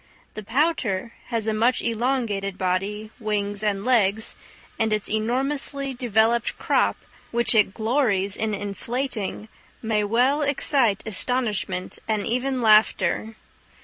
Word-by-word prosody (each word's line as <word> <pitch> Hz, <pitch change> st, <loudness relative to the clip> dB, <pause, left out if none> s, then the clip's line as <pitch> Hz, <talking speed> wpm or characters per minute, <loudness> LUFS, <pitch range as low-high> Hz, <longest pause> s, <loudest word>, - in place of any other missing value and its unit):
The 215 Hz, -, -6 dB
pouter 230 Hz, -, 0 dB
has 230 Hz, -3 st, -1 dB
a 220 Hz, -, 0 dB
much 230 Hz, +4 st, +2 dB
elongated 230 Hz, -5 st, -1 dB
body, 195 Hz, +3 st, -2 dB
wings, 205 Hz, -2 st, -2 dB
and 205 Hz, -2 st, -1 dB
legs; 220 Hz, -4 st, +2 dB, 0.4 s
and 225 Hz, -1 st, +1 dB
its 210 Hz, -1 st, +1 dB
enormously 270 Hz, +5 st, 0 dB
developed 235 Hz, -1 st, +1 dB
crop, -, -, +1 dB, 0.3 s
which 235 Hz, +1 st, +1 dB
it 210 Hz, -3 st, +3 dB
glories 220 Hz, -5 st, +1 dB
in 220 Hz, -1 st, -1 dB
inflating, 215 Hz, +2 st, -3 dB, 0.4 s
may 215 Hz, -2 st, +1 dB
well 250 Hz, +8 st, +2 dB
excite 275 Hz, -6 st, +1 dB
astonishment 215 Hz, -4 st, -2 dB
and 215 Hz, -2 st, -1 dB
even 255 Hz, +2 st, -1 dB
laughter. 220 Hz, 0 st, +3 dB
220 Hz, 115 wpm, -24 LUFS, 205-250 Hz, 0.4 s, it